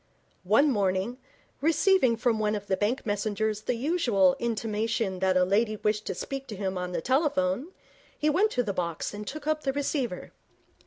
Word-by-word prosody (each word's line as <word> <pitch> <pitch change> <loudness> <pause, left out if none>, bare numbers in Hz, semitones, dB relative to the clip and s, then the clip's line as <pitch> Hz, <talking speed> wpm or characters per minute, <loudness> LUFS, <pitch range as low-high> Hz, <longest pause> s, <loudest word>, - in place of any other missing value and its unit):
One 250 +10 +4
morning, 200 +3 0 0.4
receiving 320 - +3
from 225 -1 +1
one 210 0 +1
of 205 -1 -5
the 195 - +1
bank 210 +7 -1
messengers 210 0 -1
the 245 - -1
usual 235 - +2
intimation 220 -3 -1
that 190 0 +2
a 180 - +4
lady 215 +3 +1
wished 210 0 -1
to - - -2
speak 275 0 -5
to 215 - -6
him 190 -1 -3
on 180 0 -3
the 175 - -2
telephone, 280 - +1 0.5
he 300 - 0
went 370 +8 +3
to 245 - +1
the 205 -3 -2
box 170 -1 -3
and 205 0 -7
took 305 +1 -6
up 310 0 0
the 270 -2 -1
receiver. 275 - -2
220 Hz, 180 wpm, -27 LUFS, 200-275 Hz, 0.5 s, One